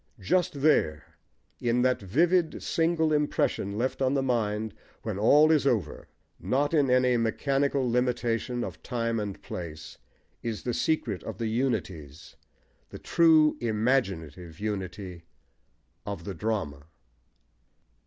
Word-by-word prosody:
Just 140 - 0
there, 80 - +1 0.4
in 120 +1 +1
that 125 -2 +2
vivid 165 - +1
single 160 -1 +1
impression 145 -8 0
left 130 +4 -2
on 130 +1 +2
the 135 - +1
mind 110 -4 -1 0.3
when 105 -3 -3
all 150 +8 +6
is 150 -3 +3
over, 105 - -1 0.3
not 145 +4 0
in 145 -4 +3
any 125 -1 +3
mechanical 135 +3 0
limitation 120 0 0
of - - -7
time 115 -2 -2
and 100 -2 -5
place, 80 -3 -8 0.4
is 115 -2 -4
the 120 - -2
secret 115 - -1
of 110 -4 -7
the 115 - -3
"unities" 95 - -3 0.5
the - - -9
true 160 -2 +4
imaginative 95 - -1
unity 95 -4 -5 0.8
of 100 -5 -6
the 100 - -5
drama. 85 -7 -3
115 Hz, 125 wpm, -27 LUFS, 95-135 Hz, 0.8 s, all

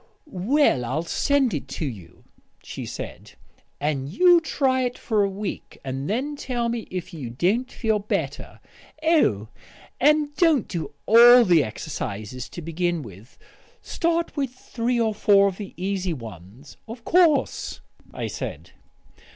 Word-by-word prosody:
"Well, 255 - +2
I'll 135 +7 -2
send 270 - +1
it 145 -3 -4
to 155 - -4
you," 95 - -9 0.4
she - - -7
said. - - -8 0.5
"And 140 -2 -2
you 350 - +5
try 265 -4 +1
it 250 -1 -2
for 215 -3 +1
a 200 - +1
week, 195 +1 -6
and 135 +3 -4
then 270 +8 -1
tell 240 -4 -2
me 230 -1 -4
if 180 -2 -6
you 140 -8 -6
don't 190 - 0
feel 220 -3 0
better. 200 - -4 0.4
Oh, 200 - +2 0.5
and 295 +1 +3
don't 325 - +3
do 155 -6 -5
all 240 +2 +8
the 170 -6 +5
exercises 115 -1 -6
to 175 - -8
begin 170 0 -1
with; 105 +1 -14 0.5
start 335 0 -1
with 275 -4 -1
three 245 -1 -3
or 220 -2 +1
four 200 -1 +4
of 190 -2 -3
the 205 -2 -7
easy 185 -1 -2
ones." 115 - -11
"Of 230 +1 -9
course," 335 -5 +2 0.3
I - - -5
said. - - -6
200 Hz, 145 wpm, -24 LUFS, -, 0.5 s, all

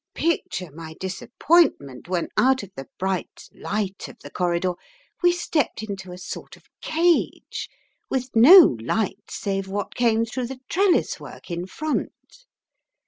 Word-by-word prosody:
Picture 250 - -1
my 160 +1 -9
disappointment 190 - +1
when 180 -2 -1
out 260 -1 +3
of 200 - -11
the 135 0 -8
bright 190 -1 -3
light 200 -2 -3
of - - -13
the - - -10
corridor 180 0 0 0.5
we 350 -1 +5
stepped 320 -9 -1
into 195 -3 -6
a 180 - -8
sort 185 - -8
of - - -24 0.2
cage, 335 +1 0 0.4
with 255 -2 -3
no 320 - +9
light 210 - -2
save 195 -1 -3
what 200 +1 -4
came 230 -2 +2
through 245 +2 -4
the 265 0 -8
trellis 380 -1 +2
work - - -11
in 175 +1 -3
front. 310 - -5
210 Hz, 140 wpm, -24 LUFS, 185-275 Hz, 0.5 s, no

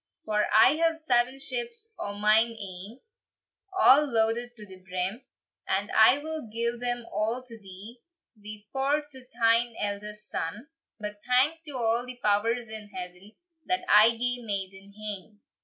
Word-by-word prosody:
"For 210 -1 +1
I 270 +7 +6
have 330 0 +2
seven 255 -3 +2
ships 460 - -5
o 205 - -4
mine 215 +3 +3
ain, 195 +5 -8 0.8
A' 285 -4 +8
loaded 240 -2 +1
to 210 - -9
the 185 -2 -12
brim, 185 +7 -3 0.4
And 200 +2 -1
I 220 +5 +6
will 310 -4 -6
gie 235 +1 -1
them 245 -1 -2
a' 225 +4 -2
to 230 -2 -9
thee 200 +5 -10 0.3
Wi 210 0 -9
four 280 +3 +1
to 260 -3 -11
thine 230 0 +3
eldest 210 +1 -4
son: 210 - -5 0.3
But 210 -1 -6
thanks 270 +6 +3
to 290 -4 -5
a' 230 0 +1
the 250 - -6
powers 230 +2 +1
in 215 -1 -7
heaven 180 +2 -9 0.3
That 365 +2 0
I 220 +2 +6
gae 245 +1 0
maiden 195 -1 -5
hame!" 210 -1 -7
225 Hz, 155 wpm, -27 LUFS, 205-250 Hz, 0.8 s, A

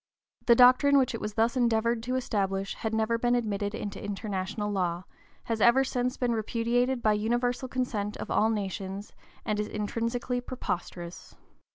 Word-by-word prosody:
The 235 - +7
doctrine 255 +4 +6
which 260 -3 +2
it 230 - -5
was 210 0 -4
thus 230 +3 +2
endeavored 235 -1 +2
to 250 +2 -2
establish 195 -6 -1
had 220 - -4
never 220 +1 +1
been 240 +1 +2
admitted 205 -3 -1
into 200 -1 -5
international 205 0 -3
law, 180 -3 -1 0.4
has 225 -2 -2
ever 240 +4 +6
since 250 -1 -1
been 245 -2 0
repudiated 235 +3 0
by 215 - +4
universal 240 +4 0
consent 225 -5 -2
of - - -6
all 220 - +3
nations, 195 -1 -4 0.3
and 210 -1 -1
is 210 - -1
intrinsically 230 +4 -2
preposterous. 175 -8 -5
225 Hz, 160 wpm, -28 LUFS, 205-245 Hz, 0.4 s, The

